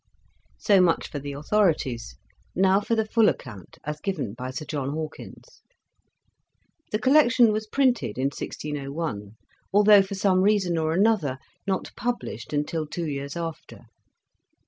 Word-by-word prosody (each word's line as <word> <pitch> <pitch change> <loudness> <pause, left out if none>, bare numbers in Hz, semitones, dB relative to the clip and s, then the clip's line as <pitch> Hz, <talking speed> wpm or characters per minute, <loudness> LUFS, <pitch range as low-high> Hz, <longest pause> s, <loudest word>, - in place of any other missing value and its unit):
..." - - -39
So 200 -4 +4
much 175 -2 +2
for 145 - -4
the 140 0 -6
authorities; 145 - 0 0.4
now 190 +1 +4
for 230 +3 0
the 220 -1 +1
full 220 0 +4
account 105 -9 -7
as 150 0 -5
given 155 - -3
by 125 +2 -6
Sir 130 +4 -6
John 140 -2 -3
Hawkins. 155 0 -8 1.3
The 215 - +1
collection 250 -2 +5
was 215 0 -2
printed 250 - +1
in 135 +1 +1
1601, 140 -9 -5 0.4
although, 205 0 +7
for 195 +1 -5
some 190 -1 +2
reason 195 -3 +2
or 160 0 0
another, 185 -8 +2 0.3
not 190 -1 -2
published 235 - -4
until 150 +1 -2
two 170 +3 -4
years 140 -2 -4
after. 165 -2 -6
165 Hz, 145 wpm, -25 LUFS, 140-210 Hz, 1.3 s, although